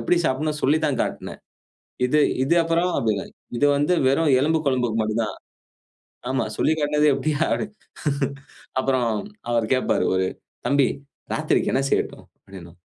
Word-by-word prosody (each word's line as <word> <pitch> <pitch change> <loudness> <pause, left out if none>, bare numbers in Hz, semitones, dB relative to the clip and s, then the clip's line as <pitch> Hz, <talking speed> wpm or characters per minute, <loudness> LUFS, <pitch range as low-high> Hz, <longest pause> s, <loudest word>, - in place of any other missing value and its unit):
எப்படி 180 - +2
சாப்பிடனும்னு 150 +2 -1
சொல்லித்தான் 150 -1 +2
காட்டினேன். - - -4 0.7
இது 150 +4 +2 0.2
இது 170 +6 +2
அப்புறம் 165 +2 +1
அதுல. 105 -4 0 0.3
இது 145 - +3
வந்து 145 +5 +2
வெறும் 145 +2 +3
எலும்பு 160 +3 +2
குழம்புக்கு 125 -4 +1
மட்டும் 110 +1 0
தான். 105 - -4 0.9
ஆமா 130 -2 +1
சொல்லி 160 - +3
காட்டினது 150 0 +2
இப்படியா. 150 +3 0 1.4
அப்புறம் 130 -3 +1 0.4
அவர் 115 -1 0
கேட்பார் 130 - +1
ஒரு 95 0 +1 0.4
"தம்பி 140 0 +3 0.5
ராத்திரிக்கு - - +1
என்ன 135 +1 +2
செய்யட்டும்?" - - -1 0.2
அப்படினு. 90 -3 -11
135 Hz, 130 wpm, -23 LUFS, 120-150 Hz, 1.4 s, இது